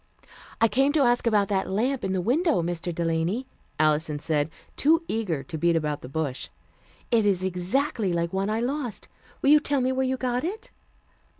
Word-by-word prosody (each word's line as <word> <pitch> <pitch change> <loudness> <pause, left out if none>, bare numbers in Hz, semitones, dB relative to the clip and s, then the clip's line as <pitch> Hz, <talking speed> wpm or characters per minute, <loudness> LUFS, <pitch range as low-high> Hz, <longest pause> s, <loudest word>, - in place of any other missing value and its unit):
"I 230 - +5
came 270 +5 +2
to 300 -3 +3
ask 240 -1 +2
about 210 -3 +3
that 195 -2 0
lamp 245 +7 0
in 190 - -1
the 190 -1 0
window, 275 - +2
Mr. 175 +1 -3
Delany," 170 +8 -1 0.3
Alison 155 0 +2
said, 150 0 0 0.3
too 325 +3 +3
eager 185 -11 -2
to 160 -3 -6
beat 170 +1 +3
about 150 -2 -1
the 125 - -9
bush. 140 -2 -3 0.6
"It 230 -2 +4
is 195 -3 +1
exactly 190 +4 0
like 170 0 -1
one 195 +2 0
I 220 +2 0
lost. 250 -3 -3 0.3
Will 280 - +5
you 300 - +8
tell 290 -1 0
me 255 0 +1
where 260 0 0
you 260 0 -1
got 250 -1 -1
it?" 390 +7 -5
205 Hz, 190 wpm, -26 LUFS, 170-260 Hz, 0.6 s, you